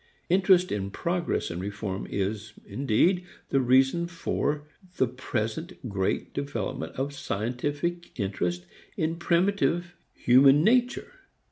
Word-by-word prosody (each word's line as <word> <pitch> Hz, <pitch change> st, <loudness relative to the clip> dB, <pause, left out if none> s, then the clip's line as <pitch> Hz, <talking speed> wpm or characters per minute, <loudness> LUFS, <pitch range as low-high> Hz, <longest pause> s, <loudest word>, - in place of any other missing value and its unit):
Interest 185 Hz, 0 st, +4 dB
in 100 Hz, -1 st, -2 dB
progress 170 Hz, -, -1 dB
and 85 Hz, +1 st, -4 dB
reform 100 Hz, 0 st, -4 dB
is, 105 Hz, +2 st, -3 dB
indeed, 140 Hz, -, +2 dB, 0.3 s
the 135 Hz, -, +3 dB
reason 135 Hz, +7 st, +3 dB
for 150 Hz, -3 st, -2 dB, 0.3 s
the 130 Hz, -, +4 dB
present 125 Hz, +5 st, -4 dB
great 100 Hz, -3 st, -1 dB
development 110 Hz, -, -4 dB
of 140 Hz, +2 st, -2 dB
scientific 145 Hz, -, -3 dB
interest 90 Hz, -3 st, -2 dB, 0.3 s
in 160 Hz, +1 st, 0 dB
primitive 175 Hz, 0 st, +1 dB, 0.2 s
human 135 Hz, +4 st, +6 dB
nature. 245 Hz, +4 st, +2 dB
135 Hz, 110 wpm, -27 LUFS, 105-170 Hz, 0.3 s, human